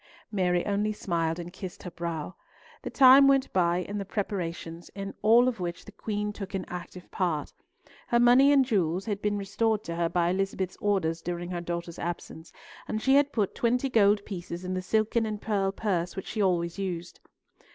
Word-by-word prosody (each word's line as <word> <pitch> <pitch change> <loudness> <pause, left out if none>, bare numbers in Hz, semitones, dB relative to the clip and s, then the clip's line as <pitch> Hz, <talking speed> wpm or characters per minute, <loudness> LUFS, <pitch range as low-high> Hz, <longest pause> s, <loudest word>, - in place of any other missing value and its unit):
Mary 180 -4 +1
only 205 +1 0
smiled 170 -5 -1
and 175 0 -7
kissed 185 -2 -8
her 180 - -7
brow. 170 -1 -4 0.5
The - - -5
time 270 +1 +8
went 275 -1 +3
by 175 -2 +2
in 205 +2 -5
the - - -2
preparations, 175 -5 -4
in 195 0 -5
all 235 +3 +6
of 250 -5 -1
which 175 -1 -4
the - - -11
Queen 210 -1 -3
took 195 -1 -6
an 190 - -3
active 180 0 -8
part. 170 -5 -1 0.5
Her 235 - +3
money 250 +4 +6
and 275 -2 +5
jewels 190 -6 0
had 205 -2 -3
been 205 0 0
restored 215 +2 0
to 170 - -5
her 170 -1 +1
by 175 -1 +1
Elizabeth's 190 -1 -2
orders 175 -5 0
during 175 +1 -4
her 175 -1 -3
daughter's 170 -1 -5
absence, 170 -1 -6 0.4
and 215 - -2
she 265 +4 +2
had 285 +1 +4
put 210 -7 0
twenty 250 +3 +1
gold 205 -2 +4
pieces 175 -2 -6
in 185 - -2
the 185 - -2
silken 220 +4 +1
and 210 -1 -4
pearl 200 -3 0
purse 180 -4 -2
which 190 - -5
she 215 - -3
always 175 -2 0
used. 175 -3 -4
195 Hz, 195 wpm, -28 LUFS, 175-215 Hz, 0.5 s, time